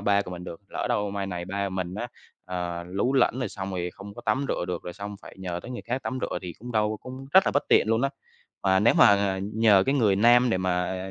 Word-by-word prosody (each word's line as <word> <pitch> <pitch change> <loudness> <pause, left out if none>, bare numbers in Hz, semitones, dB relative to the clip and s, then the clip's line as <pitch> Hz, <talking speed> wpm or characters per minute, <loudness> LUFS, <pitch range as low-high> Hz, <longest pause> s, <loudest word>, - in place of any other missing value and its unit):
ba 100 0 +2
của 90 - -9
mình 90 0 -7
được, 85 - -8
lỡ - - -3
đâu 105 -1 0
mai 100 -1 -3
này 90 -2 -4
ba 100 +2 -2
mình 95 -1 -4
á, 120 +4 -4 0.4
à, 90 -1 -4
lú 100 +8 -1
lẫn 130 -2 +3
rồi 125 - -1
xong 95 -1 -6
rồi 90 -1 -3
không 100 +1 -10
có - - -10
tắm 120 +6 +1
rửa - - -1
được 90 -1 -4
rồi 90 - -6
xong 100 +1 -7
phải - - -12
nhờ 90 -2 -4
tới 120 - -9
người 125 - -6
khác 125 +3 -3
tắm 130 - -3
rửa - - -2
thì 90 -2 -6
cũng 120 +3 -8
đâu 105 -1 +1
cũng 130 +1 -9
rất 190 - +7
là - - +3
bất 145 - +1
tiện - - +4
luôn 115 +2 +2
á. 140 - +3 0.5
Mà 95 -1 +3
nếu 115 - +4
mà 100 -1 +5 0.2
nhờ 110 -3 +5
cái 135 - +2
người 110 -8 +3
nam 120 +3 +5
để 95 - +1
mà 90 0 -1
100 Hz, 270 wpm, -26 LUFS, 90-120 Hz, 0.5 s, rất